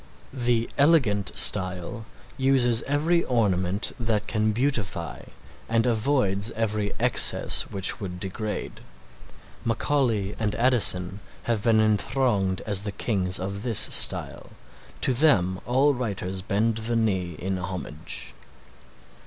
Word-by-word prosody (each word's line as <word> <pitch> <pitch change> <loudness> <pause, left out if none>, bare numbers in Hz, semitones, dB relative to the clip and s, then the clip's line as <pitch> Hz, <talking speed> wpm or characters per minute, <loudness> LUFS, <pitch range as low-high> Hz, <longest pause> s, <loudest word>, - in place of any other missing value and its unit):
The 120 -3 0
elegant 130 - +3
style 95 +4 +1 0.3
uses 130 -4 +2
every 160 +5 +1
ornament 100 -4 0
that 110 -3 -1
can 110 0 0
beautify 110 - -2 0.4
and 115 +1 +1
avoids 110 -4 +1
every 105 -2 -2
excess - - +2
which 95 -1 0
would 90 -3 -6
degrade. 105 +3 -5 0.8
Macaulay 115 -4 0
and 105 -2 -1
Addison 105 -6 +2 0.2
have 115 -3 -1
been 115 -2 +3
enthroned 105 -2 0
as 100 -3 +2
the 105 0 -4
kings 95 -3 -2
of 100 +2 -5
this 115 -2 -1
style. - - +2 0.5
To 130 - +3
them 95 - +2
all 135 +4 +3
writers 100 -6 -4
bend 110 +3 -1
the 115 +1 -3
knee 95 -7 -1
in 95 +1 -3
homage. 90 -5 -5
110 Hz, 115 wpm, -25 LUFS, 95-120 Hz, 0.8 s, elegant